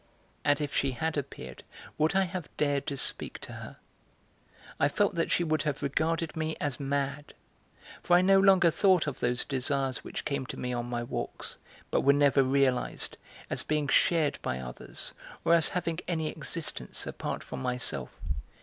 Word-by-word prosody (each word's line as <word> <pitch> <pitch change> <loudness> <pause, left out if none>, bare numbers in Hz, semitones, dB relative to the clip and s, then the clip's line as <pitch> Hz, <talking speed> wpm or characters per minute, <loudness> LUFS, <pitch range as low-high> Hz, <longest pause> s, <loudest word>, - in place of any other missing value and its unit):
And 145 0 +3
if 145 -2 -3
she 135 -1 +2
had 160 +5 -1
appeared, 140 -2 -5 0.4
would 155 +4 +2
I 195 - +5
have 180 -3 -4
dared 145 -1 +1
to 140 -3 -2
speak - - 0
to - - -8
her? - - -9 1.0
I 140 - +5
felt 205 +7 +1
that 165 -1 0
she 175 - +2
would 155 -2 +1
have 150 -2 -2
regarded 160 +3 0
me 160 0 -2
as 145 -4 -2
mad, 140 +1 -2 0.7
for 175 - +4
I 180 - +6
no 195 +1 +6
longer 190 -3 +6
thought 185 0 +4
of 145 -4 -4
those 125 +1 +1
desires 135 -1 -1
which - - -6
came 140 -3 -2
to - - -6
me 125 0 -2
on 120 0 -2
my 120 -1 -2
walks, 120 - -5 0.3
but - - +3
were 140 - +6
never 140 -1 +5
realized, 135 -1 +1 0.3
as - - -1
being 150 -1 0
shared 155 +1 +3
by 65 - -2
others, 60 -1 -6 0.3
or 170 - +5
as 165 -2 +6
having 170 -2 -2
any 160 -3 0
existence 160 +1 -4
apart - - -4
from - - -6
myself. 125 - -1
145 Hz, 175 wpm, -30 LUFS, 135-165 Hz, 1.0 s, I